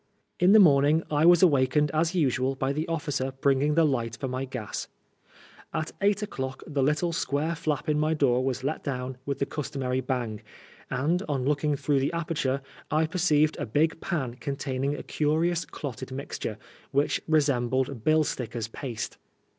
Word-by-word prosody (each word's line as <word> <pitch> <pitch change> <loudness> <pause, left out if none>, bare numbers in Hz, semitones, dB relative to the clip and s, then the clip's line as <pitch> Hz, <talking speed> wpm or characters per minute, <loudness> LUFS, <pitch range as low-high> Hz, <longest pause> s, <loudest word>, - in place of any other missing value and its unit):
In 180 +1 +5
the - - +9
morning 150 -2 +5
I 150 +2 +4
was 175 0 +7
awakened 145 -2 +4
as 165 +3 +1
usual 135 -4 +1
by 135 +1 -1
the 155 +3 -2
officer 145 -5 -2
bringing 140 +2 +2
the 165 - +5
light 115 -6 -1
for 135 - -2
my 130 +1 -3
gas. 125 -5 -5 0.9
At 155 - -2
eight 205 +1 +2
o'clock 135 -9 -5
109 150 - -11
the 140 - +1
little 150 +5 +1
square 155 +1 -1
flap 155 -2 -2
in 150 -1 +2
my 155 +1 +1
door 130 -4 +2
was 130 -1 -2
let 150 +4 -2
down 130 -2 -4
with 140 - -1
the 140 - 0
customary 130 -4 -2
bang, 120 -4 -3 0.5
and, 160 +8 0
on 135 -3 -1
looking 150 +1 +1
through 140 0 +1
the 135 +5 -1
aperture, 150 -5 -1 0.3
I 155 +1 +2
perceived 155 -2 +2
a - - -3
big 160 +8 +1
pan 130 -9 -2
containing 140 0 -2
a - - -7
curious 165 +3 0
clotted 130 -3 -7
mix 135 +2 -6
tore, 110 - -4 0.3
which 140 +2 +1
resembled 130 -4 +1
bill 155 +2 +4
stickers' 120 -5 -4
paste. 115 -3 -5
140 Hz, 175 wpm, -27 LUFS, 130-155 Hz, 0.9 s, the